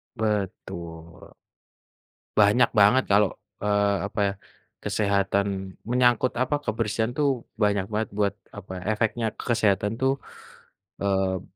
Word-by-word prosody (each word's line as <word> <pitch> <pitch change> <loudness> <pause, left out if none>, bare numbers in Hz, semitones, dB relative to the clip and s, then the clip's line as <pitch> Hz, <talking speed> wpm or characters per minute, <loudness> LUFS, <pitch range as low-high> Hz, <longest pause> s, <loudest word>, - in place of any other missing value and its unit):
Betul. 85 -6 -4 1.1
Banyak 105 +4 +5
banget 105 +6 +6
kalo, 105 +1 +6 0.4
eee, 100 -1 +2
apa 105 - -6
ya, 100 - -1 0.5
kesehatan, 100 -1 +1 0.4
menyangkut 125 0 +3
apa, 130 +3 +1
kebersihan 110 +1 -1
tuh 150 -1 +3 0.4
banyak 100 -2 +2
banget 110 0 -1
buat 100 -1 +2 0.2
apa, 95 -2 -8 0.2
efeknya 115 +2 0
ke - - -7
kesehatan 105 -3 +2
tuh, 135 0 +3 0.9
eee, 95 -2 +1
105 Hz, 110 wpm, -25 LUFS, 100-110 Hz, 1.1 s, banget